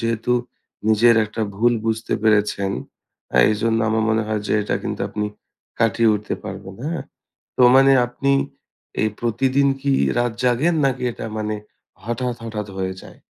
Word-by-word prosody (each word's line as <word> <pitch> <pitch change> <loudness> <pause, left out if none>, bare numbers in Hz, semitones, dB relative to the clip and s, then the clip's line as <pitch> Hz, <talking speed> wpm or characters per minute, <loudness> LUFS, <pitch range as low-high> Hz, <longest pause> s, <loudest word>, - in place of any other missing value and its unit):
যেহেতু 115 +1 0 0.6
নিজের 115 +2 +5
একটা 110 +1 -4
ভুল 120 +3 +3
বুঝতে 110 0 -1
পেরেছেন 105 -2 +2 0.6
আ - - +2
এইজন্য 115 +2 +1
আমার 110 0 +1
মনে 110 0 +2
হয় 110 -1 -1
যে - - -1
এটা - - -1
কিন্তু - - -4
আপনি 105 -1 -2 0.5
কাটিয়ে 115 0 +3
উঠতে 105 0 -3
পারবেন, 95 0 -7
হ্যাঁ? 165 +2 -3 0.5
তো - - +1
মানে 135 +1 +6 0.2
আপনি 140 +3 -1 0.7
এই 110 - +2
প্রতিদিন 130 +4 +1
কি 140 -1 +1 0.2
রাত 120 -1 +1
জাগেন 130 +8 +2
নাকি 130 -2 0
এটা 115 - -7
মানে 110 0 -2 0.5
হঠাৎ, 120 +2 -2
হঠাৎ 105 -2 -5
হয়ে 95 0 -2
যায়? - - -14
115 Hz, 155 wpm, -21 LUFS, 105-125 Hz, 0.7 s, মানে